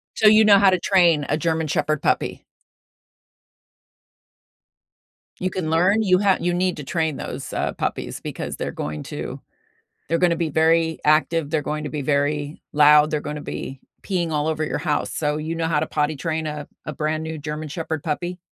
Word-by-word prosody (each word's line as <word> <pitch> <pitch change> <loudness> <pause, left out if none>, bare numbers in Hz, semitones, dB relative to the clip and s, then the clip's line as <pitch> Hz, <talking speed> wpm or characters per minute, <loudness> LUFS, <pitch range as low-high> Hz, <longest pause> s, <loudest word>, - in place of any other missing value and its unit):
So, 220 - +4
you 215 +1 +7
know 205 -1 +7
how 195 0 +6
to 185 -1 +2
train 170 -6 +3
a 150 - +1
German 160 0 -1
Shepherd 155 -1 0
puppy? - - -1 2.9
You 185 - -1
can 170 -4 -3
learn? 180 +7 +3
You 185 -4 +3
ha 195 -2 +3
you 175 +1 0
need 180 0 0
to 150 - -6
train 160 +1 -1
those, - - -6
uh, - - -1
puppies - - -3
because - - -5
they're - - -3
going 75 0 -5
to - - -6 0.7
they're 165 +2 +1
gonna 175 -1 +3
be 165 -1 -1
very 160 +1 +2
active, 155 +1 +2
they're 155 -1 0
going 150 +1 -3
to 150 - -4
be 150 -2 -3
very 145 +1 -1
loud, 150 0 +6
they're 150 - -1
gonna 150 0 -5
be 135 -2 -6 0.2
peeing 175 -4 -1
all 150 0 0
over 155 0 -1
your - - -2
house, 150 -4 -1
so 150 -1 0
you 155 +2 -3
know 165 -1 -1
how 155 -2 +1
to - - -1
potty 150 0 -1
train 160 +2 -2
a 150 -1 -5 0.2
a 150 - -5
brand 155 +1 -2
new 160 0 -5
German 150 +1 -5
Shepherd 160 -1 -4
puppy? 175 +3 -3
160 Hz, 190 wpm, -22 LUFS, 150-170 Hz, 2.9 s, you